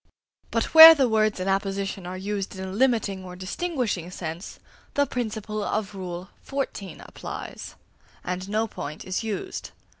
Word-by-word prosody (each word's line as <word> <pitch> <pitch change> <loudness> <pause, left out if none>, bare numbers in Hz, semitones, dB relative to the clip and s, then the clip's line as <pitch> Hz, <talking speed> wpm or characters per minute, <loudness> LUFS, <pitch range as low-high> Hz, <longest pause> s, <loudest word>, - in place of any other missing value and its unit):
But - - -1
where 320 0 +13
the 270 -4 +3
words 215 -3 +2
in 185 - -3
apposition 195 -1 -1
are 185 +1 -5
used 200 0 -4
in 190 0 -5
a - - -6
limiting 215 -4 +1
or 180 -1 -9
distinguishing 205 - -3
sense, 170 0 -6 0.4
the 285 - +3
principle 215 -4 -3
of 210 -1 -2
Rule 180 -1 -6
XIV. 265 - -5
applies, - - -8 0.5
and 185 +2 -4
no 215 +2 +1
point 150 -7 -7
is 185 +4 -2
used. 225 - -4
200 Hz, 150 wpm, -25 LUFS, 185-225 Hz, 0.5 s, where